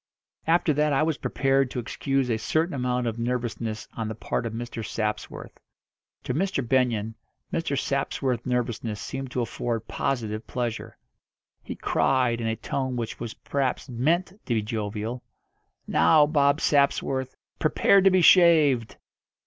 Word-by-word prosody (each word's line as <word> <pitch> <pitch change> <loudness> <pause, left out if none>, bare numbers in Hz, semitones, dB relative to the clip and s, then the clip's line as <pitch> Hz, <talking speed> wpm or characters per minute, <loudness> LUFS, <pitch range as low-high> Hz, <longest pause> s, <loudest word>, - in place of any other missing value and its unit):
After 165 -1 +3
that 150 +1 +2
I 135 - +3
was 155 -2 -1
prepared 135 -1 +1
to 125 - -4
excuse 135 +2 -1
a 110 - 0
certain 160 +9 0
amount 125 -2 -1
of 115 0 -3
nervousness 115 -2 -3
on 115 -2 -4
the 110 - -4
part 115 +2 -2
of 110 - -6
Mr. 120 0 -5
Sapsworth. 110 -1 -4 0.6
To - - -2
Mr. 160 -5 -1
Benyon 115 -4 +1 0.4
Mr. 155 -4 -1
Sapsworth's 135 -3 -1
nervousness 120 -3 -2
seemed 135 -1 -5
to 125 - -2
afford 115 -1 -3
positive 110 -5 -2
pleasure. 120 -3 -4 0.6
He - - -7
cried, 125 -3 +1
in 115 - -1
a 110 - 0
tone 130 +2 -3
which 115 -2 -4
was 115 -2 -6
perhaps 135 -1 -2
meant 155 +10 +1 0.2
to 120 - +1
be 110 - 0
jovial: 110 +2 -4 0.6
"Now, 155 -2 +5
Bob 145 0 +2
Sapsworth, 135 -2 +1 0.2
prepare 195 +5 +4
to 195 - +6
be 185 -1 +3
shaved!" 155 -10 +5
125 Hz, 150 wpm, -26 LUFS, 115-140 Hz, 0.6 s, to